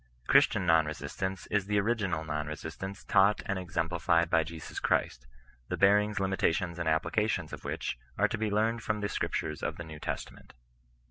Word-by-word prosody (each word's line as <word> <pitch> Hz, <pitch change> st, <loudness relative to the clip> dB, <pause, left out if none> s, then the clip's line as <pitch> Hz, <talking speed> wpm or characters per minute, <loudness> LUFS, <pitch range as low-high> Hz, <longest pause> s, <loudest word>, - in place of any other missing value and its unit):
Christian 90 Hz, -, +4 dB
non 80 Hz, -2 st, +4 dB
resistance 90 Hz, +5 st, -4 dB
is 100 Hz, -2 st, +1 dB
the 105 Hz, 0 st, +2 dB
original 100 Hz, -6 st, 0 dB
non 75 Hz, -1 st, -3 dB
resistance 80 Hz, +6 st, -6 dB
taught 100 Hz, +1 st, +4 dB
and 100 Hz, -4 st, -1 dB
exemplified 85 Hz, -1 st, +1 dB
by 80 Hz, -1 st, +4 dB
Jesus 80 Hz, 0 st, -7 dB
Christ; -, -, 0 dB, 0.4 s
the -, -, -3 dB
bearings, 105 Hz, +1 st, +4 dB
limitations, 90 Hz, -2 st, 0 dB
and 85 Hz, -2 st, 0 dB
applications 90 Hz, +2 st, 0 dB
of -, -, -7 dB
which -, -, -3 dB, 0.2 s
are -, -, +4 dB
to -, -, -3 dB
be 110 Hz, -1 st, 0 dB
learned 110 Hz, +3 st, +1 dB
from 105 Hz, -1 st, -2 dB
the 100 Hz, -, -1 dB
Scriptures 75 Hz, -5 st, -2 dB
of -, -, -3 dB
the 85 Hz, -, -6 dB
New 80 Hz, -2 st, -9 dB
Testament. -, -, -6 dB
90 Hz, 175 wpm, -30 LUFS, 80-105 Hz, 0.4 s, Christian